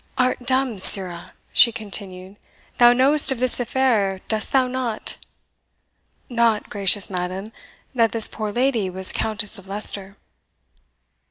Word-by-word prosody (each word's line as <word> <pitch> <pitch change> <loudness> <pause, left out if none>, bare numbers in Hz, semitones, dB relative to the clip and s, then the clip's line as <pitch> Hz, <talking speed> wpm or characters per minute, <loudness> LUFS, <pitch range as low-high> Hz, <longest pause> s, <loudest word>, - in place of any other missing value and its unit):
"Art 255 0 -1
dumb, 260 -5 -1
sirrah?" 185 -2 +3 0.2
she 235 - +6
continued; 200 -3 -6 0.4
"thou 240 0 +6
knowest 275 +4 +2
of 265 - -3
this 255 +1 +3
affair 230 -6 -1
dost 215 -1 0
thou 265 -2 +1
not?" 250 -3 -5 1.1
"Not, 235 -4 -2
gracious 200 -1 +1
madam, 185 +4 -6 0.4
that 230 -3 0
this 230 -1 +5
poor 215 -2 -7
lady 240 -4 -2
was 185 +1 0
Countess 215 -1 -2
of 190 - -18
Leicester." 195 -1 -2
220 Hz, 125 wpm, -20 LUFS, 195-250 Hz, 1.1 s, she